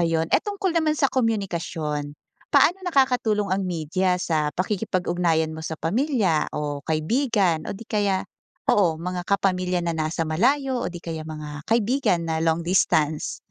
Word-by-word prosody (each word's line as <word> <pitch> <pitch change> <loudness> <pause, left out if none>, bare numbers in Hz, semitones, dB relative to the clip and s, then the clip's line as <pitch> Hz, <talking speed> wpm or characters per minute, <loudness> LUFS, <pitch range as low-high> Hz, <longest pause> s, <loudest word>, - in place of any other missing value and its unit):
ayun. 165 -1 +1
Eh, - - +4
tungkol 395 -4 -2
naman 315 -2 +3
sa 275 - +3
komunikasyon, 170 - -1 0.4
paano 355 - +5
nakakatulong 250 - +2
ang 195 +1 0
media 180 +2 0
sa 155 -4 0
pakikipag-ugnayan 175 -4 0
mo - - -6
sa 160 - -4
pamilya 210 - +1
o 145 -1 -3
kaibigan 175 - +1
o - - -2
'di 230 - -10
kaya 200 -3 +1 0.5
oo, 170 -6 +3
mga 180 +1 -3
kapamilya 185 -2 +1
na 170 -1 -1
nasa 160 +1 -1
malayo 255 - +1
o - - -1
'di 175 - -7
kaya 160 -2 -4
mga 150 -1 -7
kaibigan 225 -6 +2
na 160 0 0
long 165 0 +2
distance? 160 -4 +1
180 Hz, 150 wpm, -24 LUFS, 160-220 Hz, 0.5 s, paano